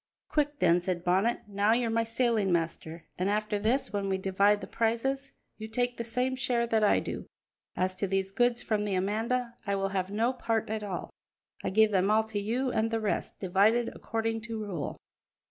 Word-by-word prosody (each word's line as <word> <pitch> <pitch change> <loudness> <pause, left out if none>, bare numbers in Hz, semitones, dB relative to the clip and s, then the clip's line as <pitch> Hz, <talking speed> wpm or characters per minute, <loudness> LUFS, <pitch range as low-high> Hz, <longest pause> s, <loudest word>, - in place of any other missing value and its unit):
"Quick 295 -1 0
then," 175 -4 +4
said 180 -1 -2
Bonnet; 190 +8 +2
"now 205 +2 +2
you're 235 -1 +1
my 230 0 +2
sailing 230 -4 +1
master; 165 -1 -2
and 185 +2 +1
after 210 0 0
this, 230 +4 0
when 200 -1 -1
we 190 - +1
divide 200 +2 +3
the - - -6
prizes, 270 +5 -1 0.3
you 220 - -5
take 245 +2 -1
the 235 - -2
same 250 +3 -1
share 245 -2 0
that 225 -2 +1
I 205 - +5
do. - - -5 0.5
As 185 0 0
to 200 - -1
these 195 0 0
goods 240 +3 +2
from 210 -2 0
the 205 -2 -1
Amanda, 225 +6 0
I 200 - +1
will 195 0 0
have 190 -1 -1
no 225 +5 +1
part 225 -3 -1
at 220 -1 -2
all; 195 -4 -5 0.5
I - - 0
give 220 +2 +4
them 190 0 +2
all 215 +1 +4
to 210 -2 -2
you 245 +5 -1
and 220 -1 +1
the 225 0 0
rest, 215 -2 -2
divided 205 +6 +2
according 225 0 -2
to 230 0 -5
rule. 190 -9 -4
215 Hz, 200 wpm, -29 LUFS, 195-235 Hz, 0.5 s, I